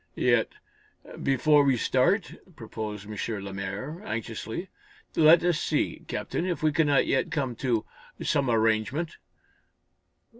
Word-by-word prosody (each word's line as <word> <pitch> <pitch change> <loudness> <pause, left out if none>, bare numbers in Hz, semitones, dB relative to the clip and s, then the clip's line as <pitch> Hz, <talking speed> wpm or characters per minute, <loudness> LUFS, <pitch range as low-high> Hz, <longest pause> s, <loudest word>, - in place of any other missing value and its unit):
"Yet, - - +2 0.7
before 145 +2 +4
we 135 -3 +3
start," - - +1 0.2
proposed 105 -2 -6
M. 105 0 -4
Lemaire, 100 - -5
anxiously, 115 - -5 0.5
"let 160 +2 +6
us 175 -3 +2
see, - - -1
Captain, - - -3
if 180 -3 -2
we 155 - +4
cannot 145 -3 +3
yet 135 - +1
come 135 -6 -2
to 120 -5 0 0.3
some 140 -3 0
arrangement." 115 +8 +1
130 Hz, 115 wpm, -27 LUFS, 110-155 Hz, 0.7 s, let